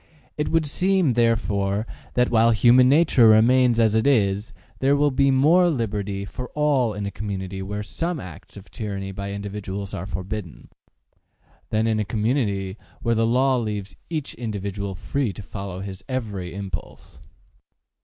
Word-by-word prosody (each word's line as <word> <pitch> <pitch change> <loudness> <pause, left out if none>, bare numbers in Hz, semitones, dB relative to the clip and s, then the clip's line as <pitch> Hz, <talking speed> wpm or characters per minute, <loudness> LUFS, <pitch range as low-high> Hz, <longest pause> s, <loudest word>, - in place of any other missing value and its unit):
It 150 - -1
would 165 -1 +2
seem, 180 +1 +2
therefore, 110 -3 +1 0.3
that, 125 0 +2
while 115 0 +5
human 120 +3 +5
nature 140 -5 +5
remains 120 +2 +5
as 110 -2 +4
it 110 +4 +2
is, 105 -5 +2 0.3
there 135 +1 +3
will 145 0 +2
be 135 +1 +3
more 160 +7 +5
liberty 105 - -2
for 125 +5 -7
all 140 -7 +2
in 105 0 -4
a 100 - -3
community 95 -2 -5
where 105 +2 -4
some 165 - -3
acts 90 +1 -11
of 100 - -13
tyranny 100 -3 -5
by 100 +1 -5
individuals 100 -1 -5
are 90 - -5
forbidden, 95 -2 -6 1.0
than 110 +1 +1
in 110 -1 +1
a - - +1
community 105 -3 -1 0.3
where 115 - +2
the 115 0 +2
law 130 +2 +3
leaves 105 -4 -4
each 155 -4 -3
individual 100 -3 -4
free 135 +4 -2
to 105 - -9
follow 95 -2 -6
his 95 -1 -7
every 105 -9 -3
impulse. 100 -1 -8
110 Hz, 155 wpm, -23 LUFS, 100-130 Hz, 1.0 s, while